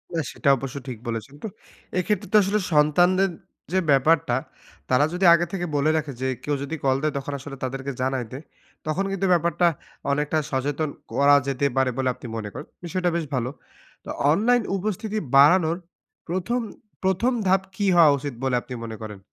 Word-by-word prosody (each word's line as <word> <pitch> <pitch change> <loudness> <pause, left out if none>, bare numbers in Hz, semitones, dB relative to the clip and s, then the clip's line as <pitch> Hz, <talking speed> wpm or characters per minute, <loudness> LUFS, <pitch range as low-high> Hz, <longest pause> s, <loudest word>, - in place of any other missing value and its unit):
না - - +1
সেটা 140 - 0
অবশ্য 135 +1 -6
ঠিক 125 - -5
বলেছেন। 115 +4 -5
তো - - -2 0.5
এক্ষেত্রে 205 +2 -1
তো - - +8
আসলে 205 +2 +1
সন্তানদের 175 +6 +4 0.4
যে 190 - +4
ব্যাপারটা, 140 -2 +3 0.5
তারা 130 +3 +4
যদি 180 +2 0
আগে 170 +1 +3
থেকে 175 -2 -2
বলে 145 +2 +2
রাখে 150 -2 -3
যে, 130 - 0 0.2
"কেউ 145 -1 0
যদি 140 +3 -4
কল 130 -1 +3
দেয় 155 -1 0
তখন 140 +1 -4
আসলে 140 +1 -8
তাদেরকে 135 +1 -3
জানাই 130 -1 -1
দে" 130 - -6 0.5
তখন 190 +6 0
কিন্তু 195 0 -1
ব্যাপারটা 170 +1 +2 0.4
অনেকটা 150 +2 0
সচেতন 145 +3 -1 0.2
করা 145 +1 +5
যেতে 140 +1 0
পারে 130 -1 +3
বলে 130 -1 +1
আপনি 125 -1 -10
মনে 105 -2 -5
করেন। - - -8 0.2
বিষয়টা 180 +1 0
বেশ 170 - -1
ভালো। 125 0 -1 0.6
তো - - -9 0.2
অনলাইন 240 +8 +3 0.2
উপস্থিতি 215 +2 -3 0.2
বাড়ানোর 160 +4 +6 0.5
প্রথম, 190 +8 -1 0.4
প্রথম 190 +7 +2 0.2
ধাপ 190 +1 +4
কী 205 - -1
হওয়া 165 -4 +7
উচিত 140 -1 -5
বলে 130 -1 +1
আপনি 125 - -9
মনে 110 -1 -6
করেন? 105 -2 -7
150 Hz, 175 wpm, -24 LUFS, 135-185 Hz, 0.6 s, তো